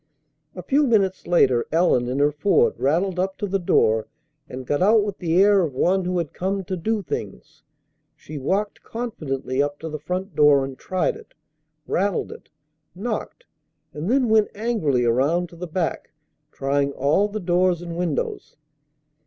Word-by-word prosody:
A 180 - -7
few 280 - +2
minutes 195 -7 +1
later 130 -9 +3
Ellen 160 -7 +2
in 125 +2 -2
her 145 +1 +3
Ford 205 - +2
rattled 175 +6 +1
up 190 +1 -1
to - - -3
the 195 0 -1
door 110 -10 +2 0.4
and 130 0 -7
got 145 +5 -1
out 210 +3 +5
with 205 -1 -5
the 170 0 +1
air 200 0 +5
of 155 -7 -2
one 185 +6 +1
who 180 0 -1
had 165 -4 -3
come 195 +2 -2
to 185 +1 -4
do 210 +4 -2
things. 60 - -7 0.5
She 150 -1 -9
walked 195 +9 -1
confidently 140 - -3
up 145 0 -2
to 160 - -5
the 155 0 -5
front 180 +6 -4
door 145 -2 +5
and 135 -1 -7
tried 185 +6 -1
it, - - -15 0.5
rattled 195 0 -1
it, - - -12 0.5
knocked, 230 - -5 0.5
and 155 +6 -4
then 255 0 +3
went 220 -1 +3
angrily 200 - 0
around 145 +9 +1
to 170 - -14
the 180 +1 -6
back, 170 0 -3 0.4
trying 140 +1 -1
all 150 +11 +2
the 210 +1 -5
doors 175 -1 +1
and 170 -1 -6
windows. 170 -4 -3
175 Hz, 170 wpm, -23 LUFS, 145-200 Hz, 0.5 s, out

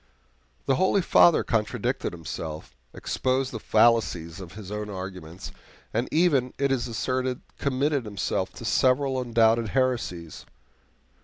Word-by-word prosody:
The 135 - +2
holy 190 0 +2
Father 170 0 +5
contradicted 115 +3 -1
himself, 80 -1 -7 0.2
exposed 130 0 -1
the 110 - -5
fallacies 100 -8 +2
of 90 -3 -9
his 100 -1 -9
own 105 0 -4
arguments, 95 -3 -7 0.4
and 115 +3 -1
even, 145 -7 +2
it 140 -1 +1
is 130 -3 0
asserted, 130 +2 -2 0.2
committed 140 0 0
himself 105 -2 -2
to - - -9
several 130 0 +2
undoubted 115 -2 +2
heresies. 115 - -2
120 Hz, 125 wpm, -26 LUFS, 100-130 Hz, 0.4 s, Father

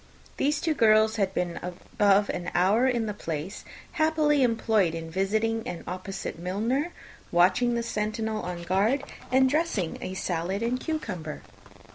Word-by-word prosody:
These 290 +1 +1
two 325 - +1
girls 220 -3 +4
had 195 -3 +1
been 180 -2 -2
above 200 +3 +1
an 175 0 -4
hour 205 +8 +4
in 240 -3 +1
the 210 - -3
place, 165 -1 -5 0.3
happily 310 -3 +2
employed 225 -7 +2
in 165 0 -6
visiting 220 +5 0
an 175 -1 -5
opposite 185 -1 -5
milliner, 225 - -1 0.4
watching 190 +8 +3
the 235 - -1
sentinel 215 0 -2
on 175 -1 -5
guard, 205 +10 +1 0.3
and 260 +1 +5
dressing 270 - 0
a 185 - -5
salad 185 +3 -2
and 245 +2 0
cucumber. 205 - -4
210 Hz, 145 wpm, -27 LUFS, 180-245 Hz, 0.4 s, and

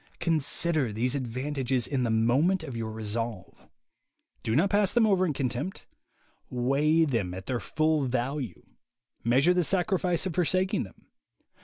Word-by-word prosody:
Consider 155 -4 +1
these 120 +4 -1
advantages 130 -1 -1
in 135 -3 -1
the 120 - 0
moment 130 +12 +2
of 135 -6 -7
your 115 -1 -3
resolve. 110 -1 -4 0.7
Do 110 - -1
not 180 +8 +3
pass 205 -1 +3
them 240 -2 +4
over 190 -3 +3
in 155 - -1
contempt. 135 +7 -3 0.6
Weigh 145 +6 +2
them 110 - -1
at 95 0 -8
their 125 +1 -2
full 155 -1 0
value. 130 +1 -3 0.6
Measure 135 +9 +4
the 180 0 +2
sacrifice 180 -1 +1
of 185 - -2
forsaking 185 - +1
them. 95 - -17
140 Hz, 145 wpm, -28 LUFS, 120-170 Hz, 0.7 s, them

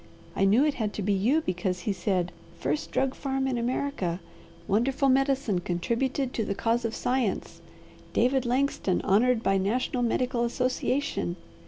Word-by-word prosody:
I 195 - +2
knew 220 +9 +5
it 300 - +2
had 215 -5 -2
to 210 - -3
be 205 +2 +2
you 235 +12 +2
because 180 - -2
he 200 +3 -1
said, 180 -2 -1 0.3
'First 145 +2 -2
drug 270 0 0
farm 270 -1 -2
in 260 - 0
America! 235 -7 -1 0.5
Wonderful 260 +7 +2
medicine 270 -7 +2
contributed 235 +10 -1
to 225 - -1
the 200 - -2
cause 230 +3 0
of 230 - -2
science! 245 -6 -1 0.5
David 260 +1 +2
Langston 250 -6 0
honoured 225 +4 +3
by 195 0 +2
National 245 +5 0
Medical 245 +1 +1
Association!' 250 -5 -1
235 Hz, 155 wpm, -27 LUFS, 195-265 Hz, 0.5 s, knew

